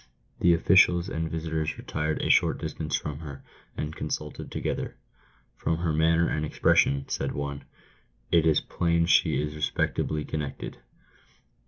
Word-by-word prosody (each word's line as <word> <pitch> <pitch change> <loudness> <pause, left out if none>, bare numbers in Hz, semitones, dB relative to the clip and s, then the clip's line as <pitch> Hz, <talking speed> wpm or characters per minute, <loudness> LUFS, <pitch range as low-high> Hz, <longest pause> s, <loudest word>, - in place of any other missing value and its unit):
The 85 -1 +5
officials 90 +1 +4
and 80 0 -2
visitors 80 -1 -2
retired 75 0 -2
a - - -1
short - - +4
distance - - -3
from 75 -2 -4
her, 70 -4 -9 0.3
and 75 +1 -4
con - - -4
sulted 75 0 -5
together. - - -3 0.6
"From 80 - -1
her 85 -2 -1
manner 80 +2 +3
and 75 - -1
expression," 70 -2 +2
said - - -2
one, 70 -1 -4 0.3
" - - -39
it 85 -2 +5
is 80 - +4
plain 85 -1 +1
she 85 - +3
is 75 0 -2
respectably 75 0 -1
connected." 75 -3 -5
80 Hz, 150 wpm, -27 LUFS, 75-85 Hz, 0.6 s, The